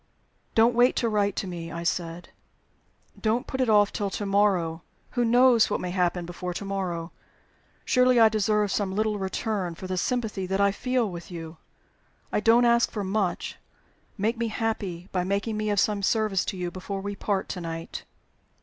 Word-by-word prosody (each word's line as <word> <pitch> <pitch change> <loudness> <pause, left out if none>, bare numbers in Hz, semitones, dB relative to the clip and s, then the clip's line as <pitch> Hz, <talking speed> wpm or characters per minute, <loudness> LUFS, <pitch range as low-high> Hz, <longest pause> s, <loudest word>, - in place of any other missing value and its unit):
"Don't 230 +2 +5
wait 245 +2 +4
to 235 - +1
write 205 -2 +1
to - - -2
me," 170 -2 -6
I 170 0 -5
said. 170 0 -3 0.9
"Don't 225 +2 +1
put 260 - -3
it 255 - +1
off 205 -1 +4
till 200 -1 -1
to 205 - -4
morrow. 190 -5 +2 0.3
Who 245 - +1
knows 240 -1 +5
what - - -1
may 180 - -4
happen 180 -1 0
before 175 +1 -5
to 200 - -4
morrow? 180 -4 -3 0.7
Surely 250 -1 +4
I 225 - +8
deserve 210 -1 +1
some 190 -2 -1
little 215 0 0
return 190 -2 -2
for 185 - -9
the 185 0 -3
sympathy 215 -4 -2
that 190 +1 -1
I 200 0 +4
feel 250 +2 0
with 175 -3 -8
you? 165 -2 -8 0.7
I - - +1
don't 230 +3 +5
ask 235 0 +4
for 210 - -4
much. 190 -2 -1 0.6
Make 225 +3 0
me 235 - 0
happy 210 -6 -3
by 180 -1 0
making 200 +4 -1
me 215 0 -1
of 205 -1 +2
some 205 0 +1
service 210 -2 +1
to 190 - -4
you 175 -1 -3
before 190 +2 -5
we 200 +1 -4
part 200 -1 -1
to 180 - -4
night." 165 -1 -6
200 Hz, 185 wpm, -26 LUFS, 180-220 Hz, 0.9 s, I